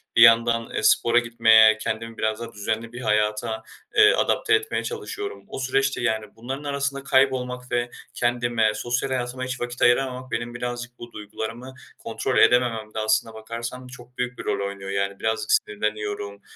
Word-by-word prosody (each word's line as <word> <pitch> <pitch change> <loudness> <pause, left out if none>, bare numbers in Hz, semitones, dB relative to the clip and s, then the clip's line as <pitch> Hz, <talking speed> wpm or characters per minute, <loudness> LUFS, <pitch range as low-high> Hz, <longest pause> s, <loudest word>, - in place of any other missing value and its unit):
bir 115 - +5
yandan, 115 0 +6
eee, - - -2
spora 120 +2 +4
gitmeye, 110 -2 +5
kendimi 115 +1 -4
biraz 110 +1 -1
daha 115 0 -7
düzenli 110 +3 -3
bir 120 - -7
hayata, 105 +1 0 0.3
eee, 420 0 +7
adapte 435 - +1
etmeye 430 0 -1
çalışıyorum. 430 - -6
O - - -7
süreçte, 135 0 0
yani, 110 -2 0
bunların 130 +5 -6
arasında 140 -1 -2
kaybolmak 130 -2 +1
ve 120 0 0 0.2
kendime 120 -2 +1
sosyal 120 +4 -2
hayatıma 130 0 -3
hiç 130 0 -5
vakit 120 0 -5
ayıramamak 130 +1 +2
benim 120 +1 -3
birazcık 120 0 -5
bu 120 0 -10
duygularımı 115 +5 -7 0.2
kontrol - - -2
edemememde 115 -3 +3
aslına 110 +1 +1
bakarsan 115 +3 -7
çok 125 -1 -14
büyük 125 0 -3
bir - - -5
rol 100 - -1
oynuyor. 100 -1 -7
Yani, 100 0 -2
birazcık 110 -1 -1
sinirleniyorum, 105 -1 -1
120 Hz, 160 wpm, -24 LUFS, 110-125 Hz, 0.3 s, eee